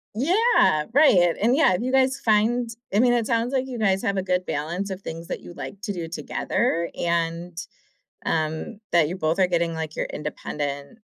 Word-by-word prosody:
Yeah, 320 Hz, -, +3 dB
right. 185 Hz, -, +5 dB
And, 235 Hz, +4 st, +3 dB
yeah, 280 Hz, -11 st, +4 dB
if 180 Hz, -, -1 dB
you 255 Hz, -, -1 dB
guys 265 Hz, -1 st, +2 dB
find 230 Hz, +2 st, +2 dB, 0.2 s
I 205 Hz, -, +3 dB
mean, 245 Hz, 0 st, +4 dB
it 235 Hz, -2 st, +1 dB
sounds 230 Hz, +1 st, 0 dB
like 265 Hz, -1 st, 0 dB
you 250 Hz, -3 st, -6 dB
guys 195 Hz, -3 st, +2 dB
have 200 Hz, 0 st, 0 dB
a 190 Hz, -, +1 dB
good 180 Hz, 0 st, -1 dB
balance 175 Hz, +7 st, -3 dB
of 190 Hz, 0 st, -6 dB
things 165 Hz, -2 st, -7 dB
that -, -, -4 dB
you -, -, -11 dB
like 200 Hz, -, -8 dB
to 210 Hz, -3 st, -3 dB
do 170 Hz, -3 st, -5 dB
together 170 Hz, +1 st, -1 dB
and, 170 Hz, 0 st, -1 dB, 0.7 s
um, 160 Hz, +4 st, -2 dB
that 170 Hz, -3 st, +4 dB
you 180 Hz, -, -4 dB
both 160 Hz, +1 st, 0 dB
are 185 Hz, -, +4 dB
getting, 170 Hz, -1 st, 0 dB
like, 160 Hz, -1 st, -5 dB
your -, -, -1 dB
independent 145 Hz, +2 st, -5 dB
185 Hz, 200 wpm, -24 LUFS, 165-235 Hz, 0.7 s, right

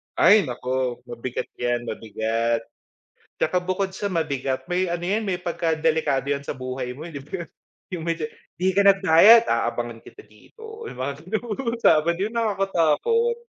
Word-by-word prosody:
Ay 205 Hz, -3 st, +6 dB
naku 125 Hz, 0 st, -2 dB
mabigat 120 Hz, +1 st, -5 dB
'yan 120 Hz, 0 st, 0 dB
mabigat. 115 Hz, +1 st, -1 dB, 0.8 s
Tsaka 180 Hz, +4 st, +1 dB
bukod 185 Hz, +1 st, -1 dB
sa 205 Hz, -, -2 dB
mabigat 140 Hz, -5 st, -2 dB
may 180 Hz, +1 st, +1 dB
ano 175 Hz, 0 st, -2 dB
'yan 210 Hz, +5 st, 0 dB
may 180 Hz, -3 st, -1 dB
pagkadelikado 160 Hz, -5 st, 0 dB
'yan 140 Hz, 0 st, -1 dB
sa -, -, -3 dB
buhay 130 Hz, -1 st, -5 dB
mo 155 Hz, +6 st, -8 dB
eh -, -, -10 dB
'di 140 Hz, -, -5 dB
ba, 175 Hz, +2 st, -5 dB, 0.5 s
'yung 175 Hz, -3 st, -4 dB
may 170 Hz, -, +1 dB
de 155 Hz, -1 st, -3 dB, 0.3 s
"Di 185 Hz, +2 st, +1 dB
ka 200 Hz, 0 st, +4 dB
nagbayad, 195 Hz, +4 st, +7 dB
aabangan 115 Hz, 0 st, -1 dB
kita -, -, -13 dB
dito" 445 Hz, -, -13 dB
'yung -, -, -9 dB
mga 140 Hz, +2 st, -2 dB
ganung 220 Hz, +2 st, -3 dB, 0.2 s
usapa 165 Hz, -7 st, +4 dB
'di 195 Hz, +5 st, -2 dB
ba -, -, -14 dB
nakakatakot. 200 Hz, -, +1 dB
160 Hz, 165 wpm, -24 LUFS, 130-195 Hz, 0.8 s, nagbayad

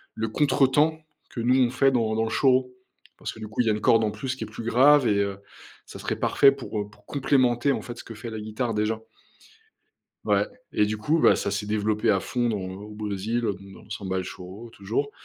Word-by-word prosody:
le 110 Hz, 0 st, -2 dB
contretemps 145 Hz, +4 st, +2 dB, 0.3 s
que 120 Hz, -, -5 dB
nous, 125 Hz, +3 st, +3 dB
on 120 Hz, -, +3 dB
fait 135 Hz, +2 st, +3 dB
dans 115 Hz, -4 st, +1 dB
dans 110 Hz, -, +1 dB
le 110 Hz, -, -2 dB
choro. 130 Hz, +1 st, +2 dB, 0.5 s
Parce -, -, -5 dB
que, -, -, -13 dB
du 110 Hz, -, -6 dB
coup, 110 Hz, +4 st, -1 dB
il 115 Hz, -, 0 dB
y -, -, +4 dB
a 110 Hz, -, +3 dB
une 105 Hz, -, -2 dB
corde 115 Hz, +1 st, +4 dB
en 105 Hz, -, 0 dB
plus, 130 Hz, +5 st, -4 dB
qui 125 Hz, -, -6 dB
est 110 Hz, -, -6 dB
plus 110 Hz, +2 st, -8 dB
grave 130 Hz, +3 st, +5 dB
et 105 Hz, -, +3 dB
heu, 100 Hz, -1 st, -1 dB, 0.5 s
ça -, -, -11 dB
serait -, -, -3 dB
parfait 140 Hz, -, +5 dB
pour, 135 Hz, -5 st, -5 dB
heu, 105 Hz, -, -7 dB
pour 105 Hz, -, -23 dB
complémenter, 130 Hz, -2 st, +2 dB
en -, -, -1 dB
fait, 120 Hz, 0 st, -8 dB
ce -, -, -9 dB
que 115 Hz, -, -9 dB
fait 115 Hz, +2 st, -7 dB
la 110 Hz, -1 st, -6 dB
guitare 110 Hz, +2 st, -3 dB
déjà». 110 Hz, +1 st, -1 dB, 1.2 s
Ouais -, -, +3 dB, 0.3 s
et 105 Hz, -, +3 dB
du 110 Hz, +1 st, -2 dB
coup, 145 Hz, +10 st, +1 dB
bah, -, -, +6 dB
ça -, -, -2 dB
s'est 105 Hz, +1 st, -2 dB
développé 105 Hz, 0 st, 0 dB
à 95 Hz, -, +4 dB
fond 120 Hz, +4 st, -1 dB
dans 110 Hz, -, -1 dB
au 95 Hz, +2 st, -7 dB
Brésil, 105 Hz, +2 st, -2 dB
donc 105 Hz, -4 st, -1 dB, 0.2 s
dans -, -, -14 dB
la -, -, -20 dB
samba 95 Hz, -2 st, -4 dB
et -, -, +1 dB
le 95 Hz, -, -3 dB
choro, 95 Hz, +7 st, -9 dB
toujours 115 Hz, +8 st, -3 dB
110 Hz, 250 wpm, -25 LUFS, 105-125 Hz, 1.2 s, bah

